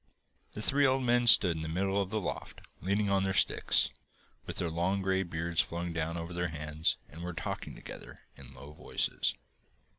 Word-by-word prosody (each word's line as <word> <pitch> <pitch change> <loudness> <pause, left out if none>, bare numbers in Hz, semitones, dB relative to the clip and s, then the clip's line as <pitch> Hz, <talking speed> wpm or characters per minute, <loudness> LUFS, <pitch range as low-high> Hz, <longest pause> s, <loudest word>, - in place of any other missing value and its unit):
The 105 - -5
three 145 +4 +3
old 130 0 +1
men 120 0 +3
stood 90 -6 +8
in 80 - -4
the 80 - -4
middle 95 +4 0
of 95 - -3
the 110 +1 -1
loft, 95 - -5 0.2
leaning 100 +2 +1
on 100 -1 +3
their 95 0 0
sticks, - - +2 0.6
with - - -5
their 85 -2 -1
long 95 +4 0
grey 95 0 +1
beards 85 -1 0
flowing 85 0 -4
down 85 +1 -2
over 85 +1 -5
their 90 0 -1
hands, 75 0 -1
and 80 +3 -11
were 90 0 -4
talking 90 +1 -5
together - - -11
in 70 - -12
low 70 +4 -11
voices. - - -1
90 Hz, 190 wpm, -31 LUFS, 80-100 Hz, 0.6 s, stood